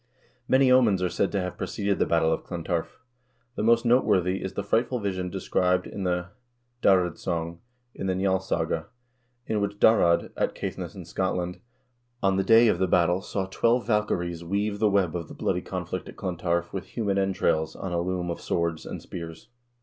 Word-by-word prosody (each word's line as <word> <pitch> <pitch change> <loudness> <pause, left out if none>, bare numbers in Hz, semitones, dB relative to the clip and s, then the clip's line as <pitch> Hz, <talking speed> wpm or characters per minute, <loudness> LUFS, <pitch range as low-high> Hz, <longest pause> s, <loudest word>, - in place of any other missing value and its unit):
Many 130 0 +4
omens 110 -8 +4
are 90 - +1
said 100 - 0
to 100 - 0
have 90 +2 -4
preceded 100 0 -1
the - - +2
battle 80 -1 +3
of - - -3
Clontarf. 85 -1 -3 0.6
The - - -4
most 115 +2 +3
noteworthy 100 -6 +3
is 95 - -4
the 100 - -3
frightful 120 +5 +1
vision 95 -3 -2
described 90 -1 0
in 100 - -5
the 90 0 -1 0.3
" 120 0 -46
Darrad 90 -4 +3
song" 85 -1 -3 0.3
in 95 - -4
the 95 - +1
"Njalssaga," 95 -4 0 0.6
in 105 -2 -1
which 100 0 -2
Darrad, 90 -6 +4
at - - -1
Caithness - - -5
in - - -8
Scotland, 90 -1 -2 0.6
on 95 -1 +3
the 95 - +1
day 115 +4 +6
of - - +2
the 95 - +2
battle 90 +1 +3
saw 95 0 -3
twelve 115 +6 +1
valkyries 90 -6 0
weave 100 +3 -1
the 110 -1 +4
web 95 -4 +1
of 85 -3 -4
the - - -11
bloody - - -1
conflict - - -5
at - - -12
Clontarf 85 -1 -2
with 95 -1 -5
human 100 -1 -1
entrails 90 -5 0
on 95 - -5
a 85 - +1
loom 90 -1 -2
of 85 - -6
swords 85 -2 -2
and - - -6
spears. 85 +4 -8
95 Hz, 190 wpm, -26 LUFS, 85-105 Hz, 0.6 s, day